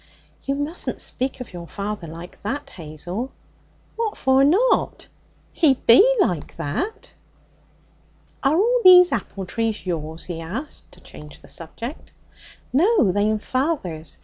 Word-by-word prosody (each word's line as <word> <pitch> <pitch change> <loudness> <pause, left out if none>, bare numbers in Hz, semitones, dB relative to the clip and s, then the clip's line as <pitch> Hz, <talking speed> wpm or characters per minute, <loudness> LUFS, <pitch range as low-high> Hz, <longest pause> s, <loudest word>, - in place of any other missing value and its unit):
'You 275 - -1
mustn't 290 +5 -3
speak 260 +1 -3
of 240 - -9
your 170 -1 -8
father 200 -2 -5
like 165 +3 -10
that, 245 +8 -4
Hazel.' 175 - -6 0.6
'What 450 -2 -2
for 265 0 +3
not? 385 - +2 0.5
He 295 -6 +4
be 245 - +6 0.2
like 175 - 0
that.' 260 - -4 1.3
'Are 275 +2 +2
all 480 +5 +3
these 360 -1 +9
apple 195 -2 -3
trees 225 +1 -2
yours?' 160 -2 -4
he 170 -2 -6
asked 225 - -7
to - - -17
change 150 -1 -13
the - - -14
subject. 230 - -8 0.6
'No, 335 - +4
they'm 210 +3 +1
father's. 215 - -3
230 Hz, 130 wpm, -22 LUFS, -, 1.3 s, these